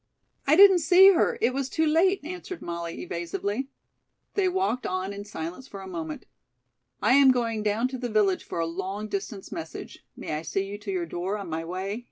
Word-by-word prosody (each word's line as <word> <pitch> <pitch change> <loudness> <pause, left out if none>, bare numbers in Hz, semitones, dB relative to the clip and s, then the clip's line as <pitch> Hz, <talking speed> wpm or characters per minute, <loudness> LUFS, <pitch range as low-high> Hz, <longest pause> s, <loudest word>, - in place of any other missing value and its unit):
"I 295 - +6
didn't 385 0 +8
see 370 +4 +7
her. 460 +7 +2
It 255 - +2
was 270 0 -2
too 320 - +1
late," 345 +5 +3
answered 355 +2 -7
Molly 170 -1 -5
evasively. 200 +9 -3 0.6
They 385 -2 +2
walked 365 -9 -1
on 185 +2 -2
in 200 0 -7
silence 180 +5 -6
for 200 - -9
a 190 - -8
moment. 165 -4 -6 0.8
"I - - +5
am 275 0 +7
going 230 -4 +1
down 215 +3 +1
to 260 -1 -6
the 245 -1 -3
village 205 -4 +2
for - - -7
a 165 - +1
long 190 +5 -4
distance 200 0 -5
message. 160 - -7
May - - -5
I 150 - -2
see 195 +4 -2
you 205 +1 -7
to 205 -1 -5
your 180 -2 -1
door 180 +5 -3
on 195 -5 -7
my 160 +1 -2
way?" 190 +5 -4
205 Hz, 205 wpm, -26 LUFS, 180-275 Hz, 0.8 s, didn't